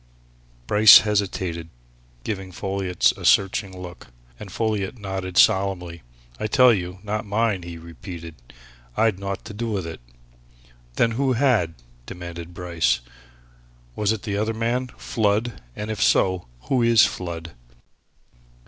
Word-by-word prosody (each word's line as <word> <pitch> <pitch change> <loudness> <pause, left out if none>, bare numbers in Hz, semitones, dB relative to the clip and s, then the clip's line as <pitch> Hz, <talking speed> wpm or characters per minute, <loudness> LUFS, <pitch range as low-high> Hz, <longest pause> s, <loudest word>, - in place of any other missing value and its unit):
Bryce 105 - +9
hesitated, 95 -5 -2 0.5
giving 95 -3 -4
Folliot 95 -1 0
a - - -11
searching 95 -1 +2
look. 90 -1 -10 0.3
And 100 - -9
Folliot 110 +1 -2
nodded 95 -3 -5
solemnly. 95 -5 +2 0.4
"I - - -1
tell 125 0 +6
you, 90 -2 -3
not 105 0 -2
mine!" 105 -2 0
he 85 -1 -8
repeated. 85 0 -9 0.6
"I'd 110 -4 +2
naught 100 0 -5
to - - -8
do 115 +3 -3
with 100 -5 -2
it!" 80 -4 -8 0.9
"Then 115 - +2
who 130 +3 +1
had?" 115 - +2 0.3
demanded 85 -1 -8
Bryce. 85 -8 0 0.9
"Was 105 -1 +1
it 110 -3 -3
the 100 -1 -2
other 110 +2 -1
man 120 +3 -1
Flood? 110 +1 -1
And 105 +1 -5
if 110 - -4
so, 95 -6 +2
who 130 - 0
is 115 -1 +6
Flood?" 85 -2 -5
100 Hz, 130 wpm, -23 LUFS, 90-110 Hz, 0.9 s, Bryce